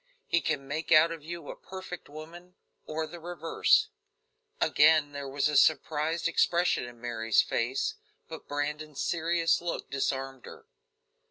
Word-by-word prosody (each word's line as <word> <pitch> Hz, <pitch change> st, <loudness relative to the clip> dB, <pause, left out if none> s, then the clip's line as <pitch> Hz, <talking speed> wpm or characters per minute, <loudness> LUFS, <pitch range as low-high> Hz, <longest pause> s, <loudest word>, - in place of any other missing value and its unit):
He 170 Hz, -, +1 dB
can 135 Hz, -1 st, -2 dB
make 155 Hz, +4 st, -4 dB
out 165 Hz, +1 st, +7 dB
of 165 Hz, -2 st, -6 dB
you 170 Hz, -1 st, -7 dB
a -, -, -9 dB
perfect 185 Hz, -3 st, -9 dB
woman, 170 Hz, +4 st, -11 dB, 0.3 s
or 160 Hz, +1 st, -2 dB
the 170 Hz, +2 st, -10 dB
reverse." 165 Hz, -1 st, +2 dB, 0.7 s
Again 150 Hz, -1 st, +4 dB
there 140 Hz, -1 st, -6 dB
was 140 Hz, +1 st, -1 dB
the 150 Hz, 0 st, +1 dB
surprised 155 Hz, +2 st, +2 dB
expression 170 Hz, -3 st, +2 dB
in 120 Hz, -1 st, -11 dB
Mary's 115 Hz, -2 st, +1 dB
face, 125 Hz, +4 st, -1 dB, 0.3 s
but -, -, -9 dB
Brandon's 150 Hz, 0 st, -3 dB
serious 165 Hz, 0 st, +1 dB
look 175 Hz, -5 st, -4 dB
disarmed 135 Hz, -1 st, -2 dB
her. -, -, -12 dB
155 Hz, 145 wpm, -29 LUFS, 140-170 Hz, 0.7 s, out